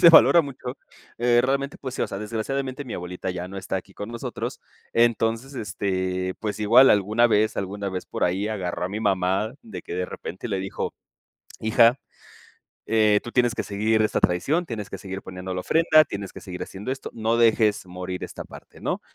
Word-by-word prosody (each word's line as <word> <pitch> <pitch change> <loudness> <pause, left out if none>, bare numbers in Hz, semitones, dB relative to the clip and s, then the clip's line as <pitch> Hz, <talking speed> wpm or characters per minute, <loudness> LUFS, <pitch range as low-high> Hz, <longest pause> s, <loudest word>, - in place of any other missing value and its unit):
se 170 - +10
valora 170 +1 +8
mucho, 130 -3 -7 0.4
eh, 120 0 +4
realmente, 140 +2 0
pues, 130 -2 -6
sí, - - 0
o - - +1
sea, 100 - -5
desgraciadamente 130 +6 -3
mi 125 - -6
abuelita 90 +1 -4
ya 90 0 -5
no 95 - -8
está 95 - -5
aquí 95 +1 -8
con 105 +2 -6
nosotros. 115 0 -5 0.3
Entonces, 115 +2 +2
este, 95 -4 -2
pues, 110 -1 -4
igual 115 +5 +7
alguna 105 +4 +4
vez 110 -1 +2
alguna 100 +1 -3
vez 95 -1 -5
por - - -5
ahí 95 +4 +1
agarró 95 -5 -3
a - - -1
mi 105 +3 -4
mamá 95 +2 +1
de 95 -6 -8
que, - - -6
de 90 0 -1
repente, 95 +7 -7
le 100 -3 -1
dijo: 95 +1 -4 0.7
"Hija, 115 +3 +5 0.9
eh, 105 -2 +4
tú 120 - -7
tienes 120 -2 +3
que - - -2
seguir 110 +2 +1
esta 110 - +1
tradición, 145 - +1
tienes 110 -6 -5
que - - -6
seguir 95 0 -6
poniendo 90 0 -6
la 90 - -2
ofrenda, 155 - +5
tienes 100 -5 -6
que - - -9
seguir 90 -1 -6
haciendo 105 +7 -6
esto, 135 - -5
no 115 +1 0
dejes 110 -3 +3
morir 90 0 -5
esta - - -7
parte, - - -14
¿no?". - - -2
105 Hz, 195 wpm, -25 LUFS, 95-120 Hz, 0.9 s, se